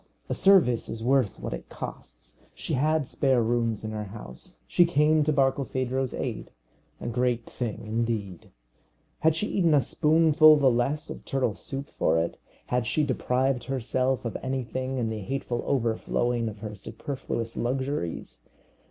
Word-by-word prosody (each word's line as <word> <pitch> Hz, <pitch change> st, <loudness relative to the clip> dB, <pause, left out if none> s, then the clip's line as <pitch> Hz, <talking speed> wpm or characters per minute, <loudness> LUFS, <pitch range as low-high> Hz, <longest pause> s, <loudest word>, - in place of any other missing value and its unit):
A -, -, 0 dB
service 185 Hz, -, +4 dB
is 115 Hz, 0 st, -5 dB
worth 130 Hz, -3 st, +2 dB
what -, -, -4 dB
it -, -, -7 dB
costs. -, -, -9 dB, 0.2 s
She -, -, -4 dB
had 155 Hz, +2 st, +2 dB
spare 130 Hz, -4 st, +2 dB
rooms 115 Hz, -2 st, 0 dB
in 110 Hz, -, -4 dB
her 105 Hz, -1 st, -4 dB
house. 95 Hz, -, -10 dB
She 175 Hz, -, +4 dB
came 155 Hz, -2 st, +3 dB
to 155 Hz, -, +1 dB
Barkilphedro's 135 Hz, -2 st, 0 dB
aid! -, -, -4 dB, 0.5 s
A -, -, -8 dB
great 120 Hz, 0 st, 0 dB
thing, 115 Hz, -3 st, -5 dB
indeed. 110 Hz, -4 st, -3 dB, 0.7 s
Had 160 Hz, 0 st, +3 dB
she 170 Hz, -, 0 dB
eaten 170 Hz, -7 st, +2 dB
a -, -, +6 dB
spoonful 155 Hz, +3 st, +5 dB
the 135 Hz, -3 st, +4 dB
less 135 Hz, +6 st, -1 dB
of -, -, -8 dB
turtle 130 Hz, -5 st, 0 dB
soup 135 Hz, +7 st, -6 dB
for 80 Hz, -, +3 dB
it? 80 Hz, +1 st, -1 dB, 0.3 s
had 125 Hz, -2 st, -1 dB
she 155 Hz, -, +1 dB
deprived 130 Hz, -1 st, 0 dB
herself 130 Hz, 0 st, -1 dB
of 115 Hz, -, -3 dB
anything 130 Hz, 0 st, -3 dB
in 115 Hz, -3 st, 0 dB
the 110 Hz, -, -4 dB
hateful 120 Hz, +3 st, -3 dB
overflowing 120 Hz, -1 st, 0 dB
of 105 Hz, -1 st, -11 dB
her 105 Hz, -1 st, -5 dB
superfluous 115 Hz, +2 st, -5 dB
luxuries? 130 Hz, -, -3 dB
125 Hz, 155 wpm, -27 LUFS, 115-140 Hz, 0.7 s, a